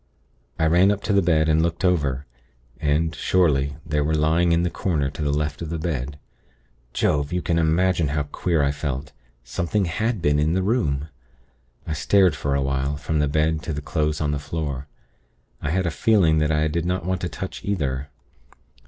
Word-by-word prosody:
"I 80 - +2
ran 90 +4 +5
up 100 0 0
to 105 - 0
the 100 - +5
bed, 80 -3 +2
and 80 0 +3
looked 85 +2 -1
over; 70 -7 +1 0.5
and, 80 +1 +1
surely, 70 -7 +1
they 75 -1 0
were 80 +2 +1
lying 80 +3 +2
in 85 +1 +3
the 90 - 0
corner 75 -7 -1
to - - -7
the 75 -1 +1
left 75 0 -2
of 85 - -4
the 85 - -2
bed. 75 -4 -3 0.7
Jove! 70 +3 0
you 90 0 -1
can 85 -1 +1
imagine 85 +1 +2
how 75 +1 -1
queer 75 +2 0
I 70 - +2
felt. 70 -1 -4 0.3
Something 85 - -1
had 110 +6 -1
been 75 -3 +2
in 80 +2 +2
the 95 +1 +1
room. 80 - 0 0.8
I 80 - -3
stared 90 +1 +3
for 70 -1 -1
a 70 - +1
while, 70 +1 -1
from 75 +1 -2
the 75 - +2
bed, 75 +2 +1
to 80 - -4
the 75 - -3
clothes 75 0 -1
on 75 -1 0
the 75 - -1
floor. 70 -2 -4 0.7
I 70 - -2
had 95 +3 0
a 85 - 0
feeling 90 -8 +3
that 75 0 +1
I 75 0 +2
did 80 +2 -1
not 90 -1 -1
want 95 0 -1
to 90 - -2
touch 95 +4 -6
either. 70 -8 -2
80 Hz, 200 wpm, -23 LUFS, 75-85 Hz, 0.8 s, ran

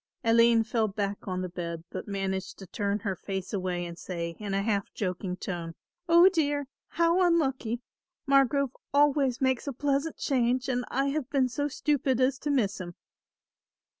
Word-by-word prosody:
Aline 230 0 +5
fell 220 0 0
back 200 0 -3
on 185 -1 -2
the - - -2
bed 170 -2 -5
but - - -6
managed 195 -1 -3
to 195 - -9
turn 200 +3 -1
her 195 -3 -2
face 190 +1 -5
away 180 -3 -2
and 170 0 -8
say 170 -2 -4
in 205 -2 -3
a 195 - +1
half 200 -2 -1
joking 185 -1 -3
tone; 170 -3 -5 0.3
"Oh, 340 +2 +8
dear, 290 -6 +1 0.2
how 335 +2 +2
unlucky! 270 -9 +1 0.5
Margrove 275 -1 +3 0.2
always 285 -3 +3
makes 260 0 +1
a 280 - -2
pleasant 285 +4 -1
change 250 -1 +1
and 250 -2 -1
I 275 +2 +1
have 280 -2 -2
been 275 -3 +2
so 285 +4 -2
stupid 275 -3 0
as 260 +1 +2
to 295 - -3
miss 220 -9 +1
him." 175 -1 -7
235 Hz, 170 wpm, -28 LUFS, 195-275 Hz, 0.5 s, Oh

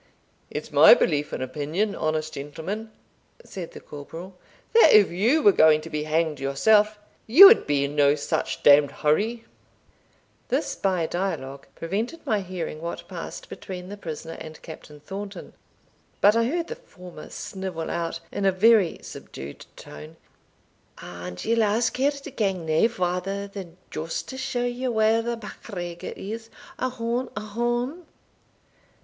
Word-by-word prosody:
"It's - - -6
my - - +9
belief 150 - 0
and - - -3
opinion, 155 +10 -2
honest 155 -2 -2
gentleman," 165 +10 -6 0.6
said 180 -4 -8
the - - -9
corporal, 165 +6 -10 0.4
"that 460 - +7
if 210 -2 +6
you 235 - +2
were 205 - +8
going 155 -4 +5
to 165 - -10
be 150 -1 -2
hanged 155 -1 0
yourself, 210 +11 +3 0.3
you 305 - +10
would 435 +4 +7
be 145 -1 +2
in 145 +1 -5
no 145 0 +4
such 145 - -3
d 145 0 +9
d 145 - -5
hurry." 215 +13 0 1.0
This - - -1
by 185 -4 0
dialogue 140 -7 -4
prevented 220 - -4
my 215 -2 +1
hearing 175 -4 -5
what 170 +1 -6
passed - - -7
between 180 -2 -8
the 205 - -6
prisoner 165 -3 -7
and 155 0 -9
Captain 150 -2 -11
Thornton; 195 +6 -8 0.7
but 205 +2 +5
I 230 0 +3
heard 335 +7 -1
the 475 - -6
former 180 - -12
snivel 190 -4 -5
out, 165 -1 -3
in - - -3
a 195 - +4
very 205 -1 +4
subdued 70 +1 -9
tone, 75 +1 -11 0.8
"And 90 0 -8
ye'll 230 0 +2
ask 220 +2 +1
her 270 +2 +3
to 285 0 -8
gang 195 -8 -1
nae 160 +7 +3
farther 195 -1 -2
than 190 -4 -9
just 160 +1 -4
to 260 - -7
show 245 -2 -2
ye 245 +1 -2
where 220 -1 +3
the 235 0 -3
MacGregor 175 -5 -7
is? 225 +3 -7 0.3
Ohon! 250 0 -2
ohon!" 240 - -2
190 Hz, 150 wpm, -25 LUFS, 155-225 Hz, 1.0 s, you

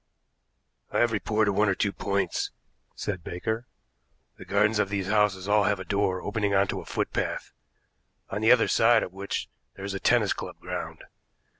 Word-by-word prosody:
"I - - -2
have 120 -1 +3
reported 105 -1 +1
one 105 +1 +3
or 95 - +2
two 100 - 0
points," 100 0 -1 0.5
said 90 -5 -4
Baker. 110 +9 -3 0.7
"The - - -9
gardens 105 +2 +2
of 100 - +1
these 100 -2 -1
houses 105 -3 +2
all 105 -1 +4
have 100 -1 +1
a 95 - -6
door 100 -2 0
opening 105 -1 0
onto 100 0 +1
a - - -13
footpath, - - -2 0.8
on 100 - -4
the 110 - +5
other 125 -2 +5
side 115 0 +4
of 90 - -7
which 100 +1 -4 0.3
there 95 - -7
is 100 - -3
a 95 - -3
tennis - - +3
club - - -8
ground. - - -6
100 Hz, 175 wpm, -27 LUFS, 100-110 Hz, 0.8 s, the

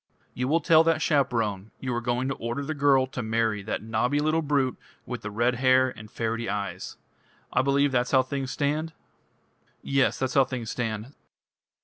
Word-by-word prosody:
"You 125 +1 -2
will 160 +4 +2
tell 160 +1 +6
that 165 -1 +3
chaperone 115 -10 0
you 130 -1 -3
are 120 - -1
going 120 +2 -1
to - - 0
order 120 +3 -4
the 155 - -2
girl 140 -2 +3
to 130 -1 -6
marry 110 -2 0
that 105 +2 -4
knobby 115 +5 0
little 155 +2 +1
brute 140 -4 +1 0.3
with - - -5
the 105 - -5
red 120 +4 +1
hair 130 0 +5
and 110 -3 -11
ferrety 115 0 -3
eyes. 100 0 -4 0.6
I 125 - +4
believe 140 +1 +2
that's 125 -1 +1
how 130 -1 +4
things 135 0 -4
stand?" 150 +4 -1 0.9
"Yes 135 -1 +2
that's 130 -1 -2
how 135 - +6
things 125 -4 -5
stand." 115 +1 -4
130 Hz, 185 wpm, -26 LUFS, 115-140 Hz, 0.9 s, tell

